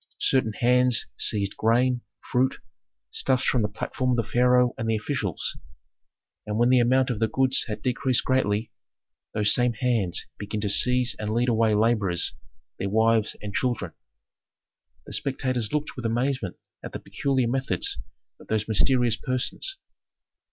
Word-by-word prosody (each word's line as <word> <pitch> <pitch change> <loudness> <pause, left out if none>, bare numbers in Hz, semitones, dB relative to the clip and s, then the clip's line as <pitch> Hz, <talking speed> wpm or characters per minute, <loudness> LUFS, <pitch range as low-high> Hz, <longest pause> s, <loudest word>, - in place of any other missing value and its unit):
Certain 120 -5 +1
hands 125 +1 +3
seized 100 -2 +1
grain, 120 +2 +2 0.3
fruit, 130 +2 +2 0.6
stuffs 130 -1 +1
from 125 - +2
the 105 - +1
platforms 125 +4 -2
of 115 - 0
the 110 - -15
pharaoh 125 0 +4
and 115 0 -3
the 110 - +2
officials; 105 - -2 0.9
and 105 0 -2
when 120 +1 +3
the 130 0 +5
amount 130 +2 +3
of 110 - -3
the 110 - +2
goods 130 +3 +2
had 105 - -5
decreased 130 0 +1
greatly, 110 -4 0 0.6
those 105 -1 +3
same 125 +1 +2
hands 110 -7 0
began 105 +1 -4
to 100 -2 -1
seize 125 +2 +2
and 105 0 -3
lead 120 +1 +2
away 110 -2 +2
laborers, 105 -5 +1 0.5
their 100 - -2
wives 110 +1 +2
and 100 -1 -5
children. 125 0 -1 1.1
The - - -9
spectators 130 -4 -2
looked 150 0 -2
with 125 -3 -3
amazement 120 -4 -1 0.3
at - - -8
the - - -4
peculiar 135 -4 -1
methods 125 -7 -1 0.4
of - - -16
those 110 -1 -1
mysterious 115 +3 +2
persons. 130 - -2
120 Hz, 150 wpm, -25 LUFS, 110-125 Hz, 1.1 s, the